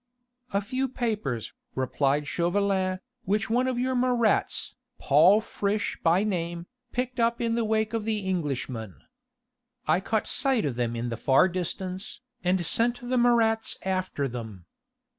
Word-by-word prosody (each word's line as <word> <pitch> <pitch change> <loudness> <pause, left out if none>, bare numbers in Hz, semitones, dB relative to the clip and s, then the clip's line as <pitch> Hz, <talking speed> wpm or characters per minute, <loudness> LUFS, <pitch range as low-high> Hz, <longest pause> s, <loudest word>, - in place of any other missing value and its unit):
"A 200 - +1
few 260 +5 -2
papers," 210 - -2 0.2
replied 135 +3 0
Chauvelin, 185 +1 +1 0.3
"which 210 +2 0
one 250 +2 +2
of 255 -2 -1
your 255 +1 0
Marats, 245 -3 +1 0.2
Paul 170 +9 +5
Friche 205 -1 -1
by 170 +4 +3
name, 170 -4 -2 0.3
picked 250 0 -2
up 235 0 +2
in 230 -1 0
the 235 0 +1
wake 220 0 0
of 225 -2 -1
the 210 -3 -2
Englishmen. 130 - -3 0.9
I - - +4
caught 215 +3 -1
sight 265 -6 +1
of 140 - 0
them 120 -1 -1
in 120 +1 -2
the 115 - -4
far 135 - +4
distance, 185 +1 -4 0.2
and 180 -1 +1
sent 240 +7 +1
the 255 - +2
Marats 230 -2 +3
after 185 -7 -1
them. 110 -8 -7
195 Hz, 145 wpm, -27 LUFS, 155-230 Hz, 0.9 s, Paul